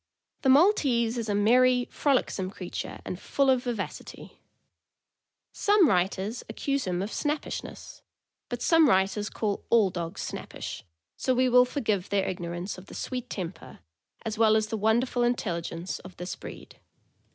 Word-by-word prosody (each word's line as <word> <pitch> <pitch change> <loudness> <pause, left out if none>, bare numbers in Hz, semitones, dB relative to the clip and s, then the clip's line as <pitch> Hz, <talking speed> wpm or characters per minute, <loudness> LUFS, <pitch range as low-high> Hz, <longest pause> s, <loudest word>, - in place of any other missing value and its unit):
The 265 - +2
Maltese 265 - +4
is 225 -2 -4
a 205 - +1
merry, 250 +4 +4
frolicsome 255 -9 0
creature, 185 -2 -6
and 180 - -5
full 275 +5 +2
of 255 -1 +1
vivacity. 235 -5 -6 1.1
Some 410 -4 +4
writers 195 +3 0
accuse 275 +4 -1
him 180 0 -1
of 205 - -5
snappishness; 300 0 -4 0.5
but 245 -1 -4
some 325 -4 +5
writers 195 +1 +2
call 205 -3 -2
all 215 -5 +4
dogs 170 -2 -5
snappish, - - -6 0.3
so 255 - +1
we 255 +1 +3
will 250 0 +6
forgive 215 -8 -1
their 200 -1 +1
ignorance 175 +1 -4
of 185 - -15
the - - -11
sweet 250 -1 -4
temper, 185 -2 -6 0.5
as 220 0 -3
well 220 -1 +5
as 215 -1 +1
the 225 - -2
wonderful 235 +4 +1
intelligence, 175 -7 -2
of 185 0 -13
this 180 +1 -5
breed. - - -11
220 Hz, 150 wpm, -27 LUFS, 190-255 Hz, 1.1 s, will